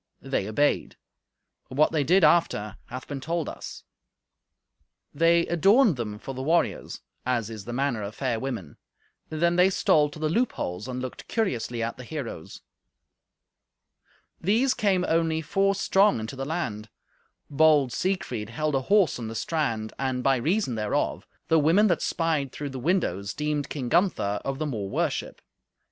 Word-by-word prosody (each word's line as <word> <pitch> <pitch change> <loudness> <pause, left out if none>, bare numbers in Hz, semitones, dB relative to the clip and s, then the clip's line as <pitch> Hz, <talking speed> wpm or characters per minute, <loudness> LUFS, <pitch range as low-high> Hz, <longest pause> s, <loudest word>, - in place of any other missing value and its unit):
They 95 - -1
obeyed; 145 +7 +1 0.7
but 130 - -8
what 155 - +4
they 155 -3 +1
did 180 +6 +4
after 150 - +2
hath 130 +1 -8
been 140 -2 -5
told 165 +1 -2
us. - - -8 1.3
They 170 +2 +4
adorned 195 - +4
them 110 -4 -4
for 135 - -7
the 130 - -5
warriors, 165 +5 0 0.2
as 120 -3 -1
is 110 -3 -8
the 120 - -6
manner 125 -2 -1
of 100 +2 -6
fair 125 -4 -1
women; 115 - -5 0.5
then 170 +2 +1
they 180 +1 +6
stole 150 -5 +3
to 145 - -11
the 155 0 -1
loopholes 140 - -1
and 125 0 -4
looked 130 - -7
curiously 120 - -1
at 115 - -3
the 125 - -8
heroes. 125 - -7 1.8
These 230 +9 +2
came 190 -3 +1
only 165 -1 +1
four 195 +4 +1
strong 195 - +3
into 110 +5 -6
the 135 0 -4
land. 115 -10 -3 0.6
Bold 145 -3 +4
Siegfried 130 - -2
held 155 +6 -2
a 135 - +1
horse 195 -2 +3
on 115 - -5
the 115 - -6
strand, 115 -7 -2
and, 130 -1 -1
by 135 -1 +3
reason 160 - 0
thereof, 105 -2 -1 0.2
the 160 - +4
women 165 +8 +4
that 175 - +1
spied 155 -5 0
through 145 -2 -5
the 130 - -6
windows 110 - -1
deemed 150 -1 -2
King 135 -5 -4
Gunther 120 - +1
of 135 0 -3
the 155 - -2
more 110 -9 -3
worship. - - -2
145 Hz, 160 wpm, -26 LUFS, 120-170 Hz, 1.8 s, they